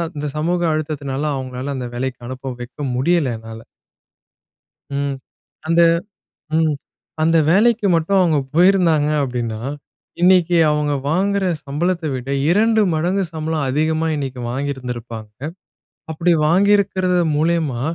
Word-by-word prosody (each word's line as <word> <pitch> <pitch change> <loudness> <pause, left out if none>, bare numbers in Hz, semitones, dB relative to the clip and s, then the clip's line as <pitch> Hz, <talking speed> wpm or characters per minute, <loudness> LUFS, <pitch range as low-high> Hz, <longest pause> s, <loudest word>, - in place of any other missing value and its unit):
இந்த 150 0 -3
சமூக 175 +3 0
அழுத்தத்தினால, 145 -3 -3
அவங்கள 130 +1 -5
அந்த 125 - -4
வேலைக்கு 130 +1 -3
அனுப்ப 130 +1 -6
வைக்க 120 +1 -10 0.2
முடியல 145 +1 +1
என்னால. 110 0 -10 1.3
ம். 140 0 -1 0.5
அந்த 165 +1 +4 0.7
ம். 160 -2 +2 0.5
அந்த 165 +1 +3
வேலைக்கு 215 +4 +3
மட்டும் 165 +4 +1
அவங்க 170 -5 +3 0.2
போயிருந்தாங்க 170 -4 +4
அப்படீன்னா, 120 -4 -3 0.6
இன்னைக்கு 180 -1 +4
அவங்க 150 -1 0 0.2
வாங்குற 195 +4 +1 0.2
சம்பளத்த 170 +5 -1
விட 130 +1 -4 0.2
2 220 +4 +3
மடங்கு 180 +5 0
சம்பளம் 155 -2 -2
அதிகமா 155 +3 0
இன்னைக்கு 135 -3 -4
வாங்கியிருந்திருப்பாங்க. 125 -5 -5 0.8
அப்படி 165 +3 +1 0.2
வாங்கியிருக்கிறது 190 0 +3 0.2
மூலியமா, 155 -5 0
155 Hz, 110 wpm, -19 LUFS, 135-175 Hz, 1.3 s, அந்த